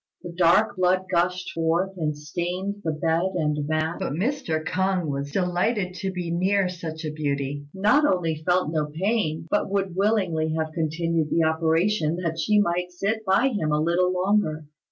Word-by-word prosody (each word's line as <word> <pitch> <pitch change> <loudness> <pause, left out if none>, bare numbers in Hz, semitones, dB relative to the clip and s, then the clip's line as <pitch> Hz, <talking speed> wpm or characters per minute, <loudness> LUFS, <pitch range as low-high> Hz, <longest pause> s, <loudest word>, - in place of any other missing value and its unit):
The 175 - -6
dark 175 +5 +3
blood 185 0 +2
gushed 180 +1 0
forth, 165 +3 0
and 155 -4 -2
stained 180 +6 -4
the 160 - 0
bed 165 +4 0
and 150 -3 +1
the 150 - -2
mat; 155 +2 -1
but - - -2
Mr. 190 - -1
K'ung 190 +1 0
was 140 -1 -3
delighted 180 +3 0
to 190 +1 -3
be 175 -2 -4
near 190 +3 +2
such 165 -2 -6
a 155 - -2
beauty, 145 -1 -3
not 210 - +3
only 165 -4 -1
felt 180 -2 +1
no 155 -2 0
pain, 165 -1 -1
but 205 - +1
would 195 -2 -1
willingly 185 -6 +1
have 160 0 -2
continued 165 0 -1
the 165 - +2
operation 160 +2 +1
that 165 -2 -3
she 210 -1 +3
might 180 -2 0
sit 200 +5 -2
by 200 +8 +4
him 170 -11 -1
a 150 - +2
little 175 +3 +2
longer. 180 -4 0
175 Hz, 175 wpm, -25 LUFS, 160-190 Hz, -, by